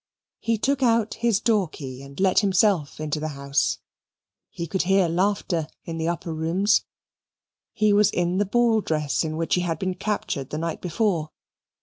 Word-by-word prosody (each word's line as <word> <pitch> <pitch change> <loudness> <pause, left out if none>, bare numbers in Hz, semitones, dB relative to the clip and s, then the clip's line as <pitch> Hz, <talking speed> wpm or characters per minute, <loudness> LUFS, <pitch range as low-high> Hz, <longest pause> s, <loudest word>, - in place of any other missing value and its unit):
He 230 -1 0
took 275 +5 0
out 230 -3 +2
his 230 -4 +1
door 215 -5 +2
key 135 -4 -8
and 140 0 -11
let 190 -1 +4
himself 190 -7 +2
into 155 0 -2
the 155 - -3
house. 140 0 0 0.7
He 170 - -5
could 185 +3 -1
hear 190 0 +3
laughter 175 -2 0 0.2
in 165 -1 -5
the 160 - -1
upper 170 -1 -3
rooms. 170 +6 +2 0.9
He 215 -1 +2
was 205 -1 +5
in 175 +1 0
the 205 - +2
ball 230 0 +3
dress 150 -5 0
in 155 -1 -3
which 165 0 -1
he 180 - +3
had 165 -3 -1
been 185 +2 -2
captured 180 -8 -3
the 150 - -4
night 165 0 -3
before. 175 -3 0
180 Hz, 180 wpm, -24 LUFS, 160-205 Hz, 0.9 s, was